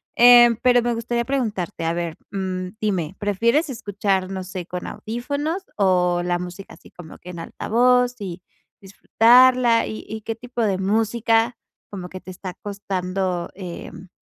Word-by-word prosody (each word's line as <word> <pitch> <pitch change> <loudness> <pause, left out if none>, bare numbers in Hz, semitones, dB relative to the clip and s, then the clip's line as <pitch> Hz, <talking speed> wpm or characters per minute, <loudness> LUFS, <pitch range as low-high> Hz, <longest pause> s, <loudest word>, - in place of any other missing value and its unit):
Eh, 240 -1 +8
pero 245 -1 +5
me 240 0 0
gustaría 235 +1 -2
preguntarte, 210 -10 -2
a 165 - +1
ver, 170 -2 -3 0.2
mm, 185 -2 -3
dime, 190 -5 -2
¿prefieres 235 - +1
escuchar, 200 -5 -1
no 190 -1 -4
sé, 185 -2 -6
con 180 0 -6
audífonos? 285 - -4
O 180 -3 +2
la 175 0 0
música 180 +2 -8
así - - -18
como 165 -3 -12
que, 180 - -10
en 170 - -8
altavoz 250 +7 +2
y 180 -2 -6 0.4
disfrutarla. 240 +4 +4
Y 215 - -7
y, 220 0 -6
¿qué 225 +1 -4
tipo 240 0 -5
de 195 -3 +1
música, 225 +3 +1 0.3
como 185 -3 -7
que 185 0 -9
te 185 - -10
está 185 0 -7
costando, 185 -3 -3
em, 185 0 -8
205 Hz, 155 wpm, -22 LUFS, 185-235 Hz, 0.4 s, Eh